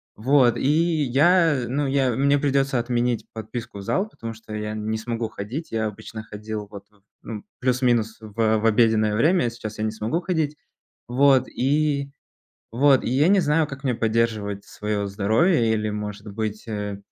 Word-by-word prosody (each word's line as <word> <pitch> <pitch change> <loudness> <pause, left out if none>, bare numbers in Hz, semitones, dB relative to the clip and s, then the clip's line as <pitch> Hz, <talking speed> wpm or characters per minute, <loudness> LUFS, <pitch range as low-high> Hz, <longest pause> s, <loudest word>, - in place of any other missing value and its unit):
Вот 125 0 +3
и 155 +3 +2
я, 150 +1 +3
ну, 140 +3 -1
я 135 -2 +1
мне 140 +3 +3
придётся 135 -2 +1
отменить 120 -2 -1
подписку 110 0 -7
в - - -6
зал, 190 - 0
потому 115 - -7
что 110 -1 -11
я 105 0 -3
не 110 +1 -2
смогу 115 0 -3
ходить. 115 +11 -6
Я 110 -1 0
обычно 110 +1 -8
ходил 105 0 -6
вот, 100 -1 -10
м, 100 -1 -29 0.2
ну, 110 -3 -7 0.2
плюс-минус 120 -3 +1
в 110 0 0
в 110 - -3
обеденное 110 -1 +3
время, 155 - +3
сейчас 110 -2 -8
я - - -1
не - - 0
смогу 110 +10 -2
ходить. 160 -5 -1 0.5
Вот 130 +1 +4
и 140 +1 0 0.6
вот 135 +2 +4
и - - -1
я 135 +5 +3
не 200 0 +5
знаю, 155 -1 +2
как 135 -1 -9
мне 130 -2 +1
поддерживать 110 -3 -1
своё 105 -1 -3
здоровье, 110 - +2
или, 110 -1 -1
может 105 0 -6
быть, 110 0 -4
э, 105 -2 -4
115 Hz, 170 wpm, -23 LUFS, 110-140 Hz, 0.6 s, не